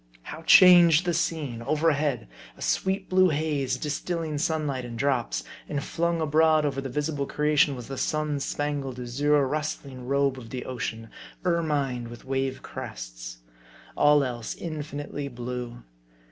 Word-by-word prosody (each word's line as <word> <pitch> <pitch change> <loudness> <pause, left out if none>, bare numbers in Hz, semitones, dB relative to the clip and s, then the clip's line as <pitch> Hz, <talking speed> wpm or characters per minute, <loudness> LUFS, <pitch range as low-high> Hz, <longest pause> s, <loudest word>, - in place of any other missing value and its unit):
How 155 - -8
changed 175 -1 +7
the 175 - +1
scene! 155 -8 -2
Overhead, 150 - +1 0.3
a - - -15
sweet 190 0 0
blue 185 0 +4
haze, 150 -3 -1
distilling 155 +1 -3
sunlight 150 -4 -1
in 120 -1 -7
drops. 120 - 0 0.3
And 145 -2 -2
flung 170 0 -1
abroad 155 0 +3
over 135 -2 -1
the 135 - -5
visible 145 +1 -2
creation 150 -1 +2
was 125 -2 -8
the 135 -1 -5
sun 155 -2 -1
spangled, 140 -3 -3
azure, 140 +3 +1
rustling 140 -3 -4
robe 140 -1 +1
of 115 -2 -11
the 125 +1 -5
ocean, 115 -3 -5 0.3
ermined 145 -8 0
with 120 0 -11
wave 135 0 -2
crests; - - -8 0.5
all 145 -1 +5
else, 120 -4 -4
infinitely 145 -3 -5
blue. 120 -1 -6
145 Hz, 140 wpm, -26 LUFS, 125-155 Hz, 0.5 s, changed